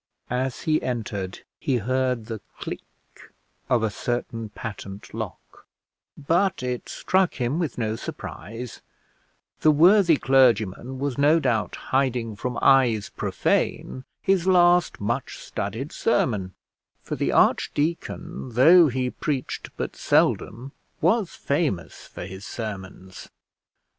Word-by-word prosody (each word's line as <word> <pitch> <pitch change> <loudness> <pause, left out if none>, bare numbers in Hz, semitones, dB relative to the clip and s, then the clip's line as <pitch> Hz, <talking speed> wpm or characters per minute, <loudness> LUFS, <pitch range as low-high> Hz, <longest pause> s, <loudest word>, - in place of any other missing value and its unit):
As 125 0 -1
he 155 -1 +2
entered 105 -6 -4 0.2
he 135 -3 0
heard 125 0 0
the 110 -2 -6 0.2
click - - -5 0.9
of 120 -3 +3
a 110 - +1
certain 115 -1 -3
patent 100 -2 -8
lock, - - -8 0.5
but 175 +3 +1
it 125 -1 -3
struck 185 -1 +1
him 125 +5 -1
with 160 -8 -2
no 110 -2 -1
surprise; 115 +3 -7 0.8
the 155 - +4
worthy 170 +2 +6
clergyman 125 -2 +2
was 140 -1 -2
no 150 +4 +5
doubt 115 -7 0
hiding 125 -4 -1
from 125 +3 -4
eyes 120 -6 +4
profane 130 - -1 0.2
his 190 -2 +2
last 175 -1 +4
much 110 +3 -2
studied 115 - -5
sermon; 105 - 0 0.5
for - - -4
the - - 0
archdeacon, 145 -4 0
though 165 +8 +7
he 125 -1 -1
preached 140 -4 -3
but - - -4
seldom, 125 +5 +1 0.3
was 190 +3 +1
famous 140 - -2
for - - -8
his 95 +1 -9
sermons. 95 -5 -7
125 Hz, 120 wpm, -24 LUFS, 110-150 Hz, 0.9 s, though